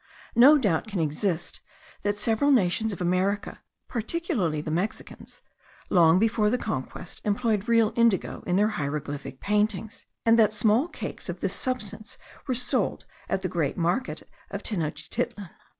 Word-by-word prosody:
No 275 +6 +8
doubt 205 - +1
can 205 -4 -3
exist 165 +3 -2 0.4
that 205 0 -1
several 225 +6 +2
nations 220 -3 +3
of 185 - -6
America, 185 +3 0 0.3
particularly 230 - -1
the 155 +1 -4
Mexicans, 180 +7 -4 0.5
long 170 -2 +6
before 215 0 +2
the 250 - +1
conquest, 175 - -5
employed 215 0 0
real 230 -2 +3
indigo 230 -5 +2
in 180 - +1
their 210 +2 +3
hieroglyphic 145 -6 -4
paintings; 210 +1 -1 0.2
and 230 0 +5
that 215 -1 +5
small 220 +7 +3
cakes - - -6
of - - -5
this - - 0
substance 215 -4 -3 0.3
were 255 - 0
sold 250 - -1 0.2
at 190 - -1
the - - +1
great 165 -6 -1
market 180 +9 -1 0.2
of - - -5
Tenochtitlan. 165 +1 -3
205 Hz, 145 wpm, -26 LUFS, 175-230 Hz, 0.5 s, No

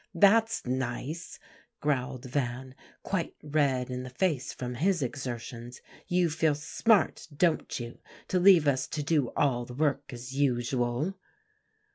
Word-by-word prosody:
"That's 220 +5 +4
nice," 130 +5 -3 0.4
growled 135 -3 -1
Van, 130 0 -3 0.3
quite 185 -4 -2
red 140 -4 +1
in 125 0 -3
the 125 - -7
face 140 -1 0
from 125 -1 -5
his 170 +4 +1
exertions; 120 -1 -5 0.3
"you 180 -3 +2
feel 160 -1 +2
smart, 200 +8 +2
don't 160 0 +1
you, 120 0 -7 0.3
to 185 - +2
leave 180 -5 +7
us 135 -1 +2
to 150 - -3
do 145 -3 +2
all 125 -4 +2
the 120 0 -9
work 145 -1 0
as 125 +1 -8
usual." 130 +5 0
140 Hz, 135 wpm, -29 LUFS, 125-160 Hz, 0.4 s, leave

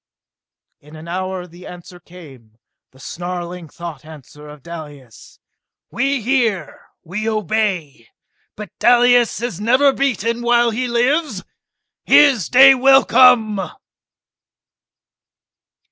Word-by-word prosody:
In 150 +2 -17
an 160 +2 -12
hour 185 +1 -5
the 175 +1 -15
answer 180 +1 -13
came, 140 -12 -17 0.3
the 130 - -23
snarling 175 0 -7
thought 170 0 -10
answer 150 -1 -15
of 150 -2 -14
Dalis. 145 -8 -12 0.5
"We 270 0 -2
hear! 235 -6 -2 0.2
We 210 +6 -5
obey! 195 - -3 0.5
But 210 0 -10
Dalis 245 -1 +2
is 205 -6 -5
never 260 +5 +2
beaten 235 -4 -2
while 240 0 +1
he 250 +3 -3
lives! 245 - -1 0.6
His 270 - +3
day 270 +2 +7
will 270 +1 +4
come!" 225 -5 +3
205 Hz, 105 wpm, -17 LUFS, 170-245 Hz, 0.6 s, day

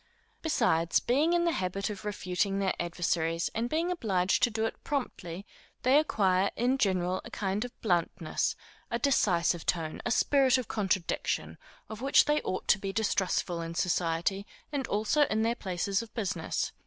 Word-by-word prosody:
Besides, 170 - +2
being 295 +8 +2
in 345 0 +2
the 340 - +3
habit 195 - -2
of 205 - -8
refuting 195 -1 -1
their 195 -1 +1
adversaries, 170 -1 -1
and 230 +2 -1
being 330 +5 0
obliged 195 - +1
to 245 - +4
do 220 0 -1
it - - -5
promptly, 200 - -4 0.4
they 265 +4 +6
acquire, 195 -10 +2
in 250 +4 +1
general, 185 -3 +1
a - - -9
kind 195 +1 -2
of 245 - -10
bluntness, 175 -4 0 0.3
a 235 - 0
decisive 180 - +2
tone, 160 -3 -2
a - - -2
spirit 265 +2 +4
of 255 - -4
contradiction, 190 -4 -1 0.3
of 220 +1 -8
which 275 +2 +5
they 295 +1 +2
ought 185 - -4
to - - +5
be 195 0 -3
distrustful 190 -4 0
in 165 0 -5
society, 175 +3 0 0.2
and 275 -4 -2
also 220 +9 +2
in 220 +1 0
their 230 +1 +2
places 195 -1 -2
of 230 -2 -10
business. 185 -7 -2
200 Hz, 165 wpm, -29 LUFS, 180-240 Hz, 0.4 s, they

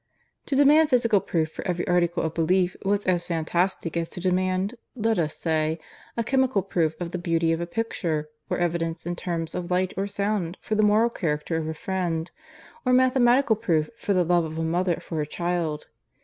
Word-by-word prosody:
To 280 - 0
demand 295 +3 +6
physical 235 -5 +4
proof 160 -2 -1
for - - -7
every 175 -1 -1
article 175 -1 +2
of 160 0 -2
belief 180 +2 +2
was 200 +1 0
as 175 -2 +1
fantastic 170 +1 -1
as 165 -1 -1
to - - -6
demand, 185 +2 0 0.2
let 225 -3 +1
us 155 -2 -1
say, 160 -1 0 0.4
a 230 - +1
chemical 260 -4 +2
proof 165 -5 0
of 175 -1 -4
the 180 - -3
beauty 165 -1 +1
of 165 +1 0
a 170 - -3
picture, 170 -7 -2 0.2
or - - 0
evidence 165 -1 -1
in 175 0 -2
terms 170 -2 -3
of 180 0 -4
light 185 +1 +1
or 195 +1 0
sound 200 -3 -2
for - - -4
the 215 - +3
moral 215 +3 +4
character 155 -4 -2
of 160 -1 -2
a 160 - -3
friend, 175 -2 -2 0.5
or 255 - +2
mathematical 255 -1 +4
proof 165 -8 0
for 205 -3 -1
the 180 -2 +3
love 175 0 +3
of 160 0 -5
a 165 - -1
mother 175 +2 +1
for 165 - -7
her - - +1
child. 170 -1 -2
175 Hz, 200 wpm, -25 LUFS, 165-205 Hz, 0.5 s, demand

